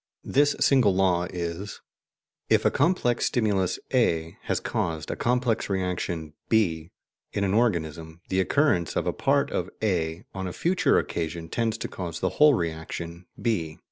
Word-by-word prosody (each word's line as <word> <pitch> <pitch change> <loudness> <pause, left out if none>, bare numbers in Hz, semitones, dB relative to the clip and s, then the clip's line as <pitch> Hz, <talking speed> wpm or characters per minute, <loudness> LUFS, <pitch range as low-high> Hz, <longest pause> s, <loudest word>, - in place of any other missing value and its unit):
This 145 +1 +3
single 125 -9 +4
law 90 -2 +2
is: 90 +3 -5 0.7
IF - - +3
A - - +5
COMPLEX 125 -9 +1
STIMULUS 100 -6 +1 0.2
A 80 0 +1
HAS - - 0
CAUSED 80 -2 -2
A - - -2
COMPLEX 120 -3 0
REACTION 90 -5 -2 0.2
B 85 -7 +1 0.4
IN 100 - 0
AN 95 -1 +1
ORGANISM, 85 -7 0
THE 95 - +1
OCCURRENCE 95 - +2
OF - - 0
A - - 0
PART - - +1
OF - - -2
A 85 -5 0
ON 95 -1 -4
A 90 - -5
FUTURE 180 +2 +2
OCCASION 80 0 -3
TENDS 115 +1 -1
TO - - -4
CAUSE 85 -3 -6
THE 95 - +1
WHOLE 150 +6 +5
REACTION 85 +1 -5
B. 90 -10 -1
90 Hz, 155 wpm, -26 LUFS, 85-110 Hz, 0.7 s, A